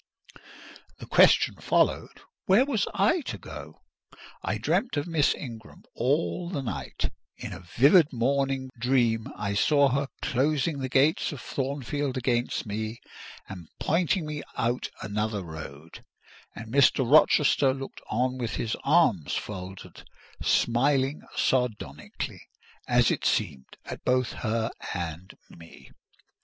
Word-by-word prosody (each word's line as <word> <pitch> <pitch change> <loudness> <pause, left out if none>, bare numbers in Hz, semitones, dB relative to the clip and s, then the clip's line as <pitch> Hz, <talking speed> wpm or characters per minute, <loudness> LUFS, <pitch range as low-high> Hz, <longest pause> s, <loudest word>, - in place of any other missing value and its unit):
The - - -9
question - - +5
followed, - - 0 0.3
"Where 200 +8 +5
was 235 -8 0
I 335 +1 +2
to - - -4
go?" - - -10 0.6
I - - -2
dreamt 240 - 0
of 145 - -1
Miss 165 -4 +2
Ingram 115 -5 -10
all 155 +7 0
the 145 -7 -3
night: 120 - -4 0.3
in - - -7
a - - -8 0.2
vivid 145 +5 +6
morning 135 +1 0
dream 120 -2 +1
I 100 -1 -3
saw 140 +7 +4
her 140 +2 0 0.2
closing 145 +3 0
the 130 -1 -3
gates 140 +7 +2
of 145 - -7
Thornfield 140 +1 -3
against 120 -1 -1
me 110 +2 -4 0.5
and 90 -4 -9
pointing 170 +1 +1
me 150 -1 -4 0.2
out 120 +2 -1
another 105 +1 -2
road; 80 -1 -10 0.5
and 115 0 -8
Mr. 135 -2 +4
Rochester 145 -1 +5
looked 135 0 -7
on 125 +3 0
with 115 -2 -3
his 110 - -2
arms 135 - +3
folded—smiling 120 +7 -2
sardonically, 105 - -2 0.5
as - - +4
it - - -2
seemed, 65 -1 -1
at - - -8
both 125 -1 +1
her 115 0 -2 0.2
and 85 0 -5
me. 85 -1 -15
130 Hz, 125 wpm, -27 LUFS, 110-145 Hz, 0.6 s, vivid